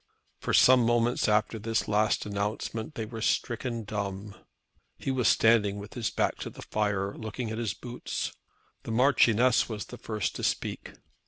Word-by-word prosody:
For - - -3
some 130 -1 +6
moments 120 +1 +2
after 105 +1 +1
his 115 +1 -1
last 105 +1 +1
announcement 105 +5 -3
they 110 - -3
were 115 0 -7
stricken 115 +1 -1
dumb. 100 -1 -4 0.6
He 135 - -2
was 130 -3 +1
standing 105 -3 +4
with 100 +1 -9
his 120 -3 -2
back - - 0
to - - -5
the - - -11
fire, 100 -2 -1
looking 110 +1 -5
at 110 - -4
his 115 -3 -2
boots. 120 0 -5 0.5
The - - -9
Marchioness 125 -1 +4
was 105 -2 -4
the 125 - -10
first 110 -3 -2
to - - -6
speak. - - -2
110 Hz, 165 wpm, -28 LUFS, 105-120 Hz, 0.6 s, some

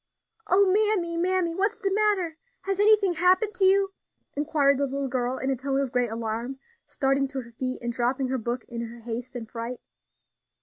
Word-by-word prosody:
"O 400 +1 +5
mammy, 385 -3 +2
mammy! 355 0 +1
what's 400 +5 0
the 390 -1 -1
matter? 400 -6 +1 0.3
has 390 0 -2
anything 415 -3 +5
happened 370 +5 +3
to 400 -4 +2
you?" 390 0 +4 0.4
inquired 285 -2 +2
the 285 - +2
little 275 0 -3
girl, 250 0 -1
in 265 - -1
a - - +1
tone 270 +2 -1
of 275 -3 -1
great 250 -2 +1
alarm, 230 +3 -4 0.3
starting 275 0 +1
to 270 -1 -4
her 235 -1 -14
feet, 255 +2 -4
and 240 0 -2
dropping 255 +2 0
her 260 0 -1
book 240 +2 -3
in 235 -1 -5
her 235 +1 -11
haste 240 +2 -6
and 230 -2 -5
fright. 235 +1 -5
275 Hz, 190 wpm, -26 LUFS, 245-375 Hz, 0.4 s, O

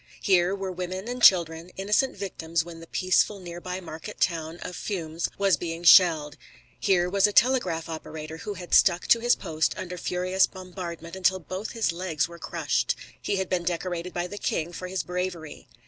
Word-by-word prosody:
Here 185 0 +3
were 195 -1 -4
women 185 +3 -5
and 245 0 -4
children, 170 -4 +5
innocent 210 +7 +1
victims 170 -4 -2
when 170 -1 -10
the 165 - -12
peaceful 185 +4 +1
nearby 180 +1 -6
market 160 -3 -9
town 165 -1 -1
of 180 - -6
Furnes 165 -5 -3
was 195 -2 +3
being 165 0 -5
shelled; 160 -4 +6 0.4
here 180 -3 +2
was 200 +2 +3
a - - -2
telegraph 200 -8 +2
operator 160 -1 -7
who 205 +5 -6
had 180 -1 -8
stuck 180 -2 +5
to 235 - +6
his 240 +1 +3
post 160 0 -1
under 180 -1 -6
furious 185 +2 +1
bombardment 180 -2 -8
until 190 0 +2
both 185 +4 -6
his 225 -5 +1
legs 170 -3 -1
were 170 0 -12
crushed. - - -1 0.3
He - - -1
had 190 -1 -1
been 180 -1 0
decorated 175 0 -3
by 175 0 -2
the 205 +3 -7
king 170 +2 -2
for 180 - -6
his 190 0 -2
bravery. 180 -3 -5
180 Hz, 180 wpm, -26 LUFS, 170-190 Hz, 0.4 s, shelled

